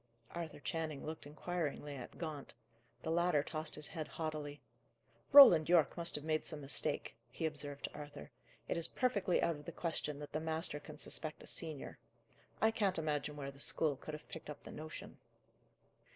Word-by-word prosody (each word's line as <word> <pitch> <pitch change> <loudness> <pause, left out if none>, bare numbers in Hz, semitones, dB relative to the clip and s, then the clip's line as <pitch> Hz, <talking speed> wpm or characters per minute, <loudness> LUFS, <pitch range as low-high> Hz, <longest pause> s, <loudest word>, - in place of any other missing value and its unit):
Arthur 170 -3 -5
Channing 155 -2 -3
looked 155 -1 -5
inquiringly 150 -2 -3
at 125 -3 -8
Gaunt. 155 -4 -5 0.5
The 160 - -1
latter 170 -3 +3
tossed 155 0 -3
his 150 - -5
head 155 0 -4
haughtily. 155 -2 -4 0.7
"Roland 180 - +11
Yorke 170 -4 +5
must 170 -1 0
have 150 - -3
made 155 0 +1
some 155 - -4
mistake," 140 -1 -1
he 160 - -3
observed 145 -2 -2
to - - -3
Arthur. 145 - -8 0.4
"It - - 0
is 165 - 0
perfectly 200 -8 +2
out 165 -3 +2
of 145 - -12
the - - -5
question 155 -3 -2
that 145 0 -7
the 155 - -1
master 160 -1 -1
can 150 0 -10
suspect 155 +1 -4
a - - -10
senior. 155 -4 -3 0.6
I 220 - +6
can't 200 -4 +1
imagine 150 -2 -1
where 140 -1 -5
the 140 - -16
school 150 0 +2
could 150 +3 -6
have 150 - -11
picked 160 - -8
up 150 - -7
the - - -9
notion." 155 +1 -8
155 Hz, 180 wpm, -37 LUFS, 145-165 Hz, 0.7 s, Roland